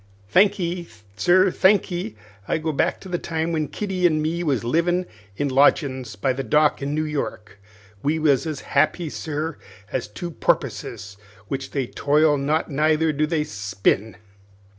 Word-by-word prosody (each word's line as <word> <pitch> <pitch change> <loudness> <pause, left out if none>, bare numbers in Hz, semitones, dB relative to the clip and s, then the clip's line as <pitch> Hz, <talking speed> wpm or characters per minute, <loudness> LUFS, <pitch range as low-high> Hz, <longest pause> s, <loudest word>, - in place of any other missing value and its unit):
"Thankee, 180 - +2 0.3
sir, 185 - +4
thankee. 180 - +2 0.3
I - - +1
go 160 0 -2
back 145 - 0
to - - -10
the 175 -2 -2
time 160 0 -2
when 155 -2 -1
Kitty 185 +1 0
an' 155 -2 +1
me 160 +3 -1
was 140 -9 0
livin' 170 +8 +1 0.3
in 145 - 0
lodgin's 130 -3 +2
by 130 +6 0
the 135 - -3
dock 150 +5 +2
in 140 +2 -2
New 155 - 0
York. 140 -9 -5 0.4
We 150 +3 +1
was 150 -2 +2
as 155 -2 -4
happy, 155 +3 +1
sir, 155 0 -4 0.3
as - - -2
two 170 +12 -6
porpusses, 105 - -2 0.3
which 135 0 -3
they 135 -3 -1
toil 150 +4 +2
not 150 +3 0
neither 155 +2 +2
do 150 +1 +1
they 155 -2 0
spin. 100 -2 -1
155 Hz, 160 wpm, -23 LUFS, 135-170 Hz, 0.4 s, sir